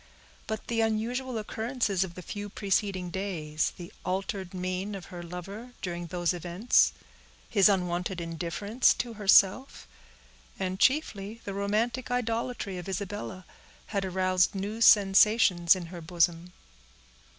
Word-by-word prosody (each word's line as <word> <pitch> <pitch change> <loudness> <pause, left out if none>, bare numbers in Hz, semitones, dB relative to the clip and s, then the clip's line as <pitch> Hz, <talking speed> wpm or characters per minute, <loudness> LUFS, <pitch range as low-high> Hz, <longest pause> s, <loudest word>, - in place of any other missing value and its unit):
But 220 0 -4
the 230 -1 0
unusual 230 +3 -1
occurrences 220 -2 -1
of 175 -3 -8
the 180 - -8
few 205 +3 -6
preceding 195 -3 -1
days, 165 -6 -2
the 175 +2 -10
altered 190 0 -3
mien 185 +2 -3
of 190 - -8
her 175 - -6
lover 195 +8 -8
during 175 -1 -4
those 175 +1 0
events, 175 +7 +2 0.6
his 205 -2 +5
unwonted 180 -1 -1
indifference 170 +8 +1
to 240 -1 -4
herself, 205 +4 +3 0.7
and 190 0 -3
chiefly 225 -7 +1
the 200 - -4
romantic 215 +6 -1
idolatry 230 -5 -2
of 180 - -7
Isabella, 195 -1 -5 0.5
had 200 -1 0
aroused 185 0 +1
new 205 +4 -4
sensations 200 -4 +6
in 180 -2 -6
her 175 - -7
bosom. 170 +1 0
195 Hz, 130 wpm, -28 LUFS, 180-220 Hz, 0.7 s, sensations